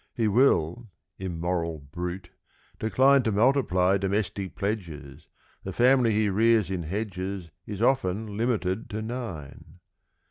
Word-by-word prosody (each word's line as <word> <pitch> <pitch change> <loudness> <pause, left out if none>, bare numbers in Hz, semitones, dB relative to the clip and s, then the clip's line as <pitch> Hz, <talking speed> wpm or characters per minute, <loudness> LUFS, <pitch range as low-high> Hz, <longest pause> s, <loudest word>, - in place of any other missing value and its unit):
= - - -51
He 110 - +3
will, 110 - +2 0.3
immoral 85 -2 -2
brute, 90 +6 -6 0.5
decline 135 +5 +4
To 115 -3 0
multiply 100 -5 +3
domestic 100 0 -2
"pledges," 80 -8 -5 0.4
The 95 - -5
family 125 +1 +4
he 105 0 +2
rears 110 0 +3
in 90 -2 -2
hedges 95 -1 -4 0.2
Is 105 +1 -3
often 110 -5 0
limited 110 -2 -1
to 110 0 -4
nine. 110 - -7
100 Hz, 120 wpm, -27 LUFS, 90-115 Hz, 0.5 s, decline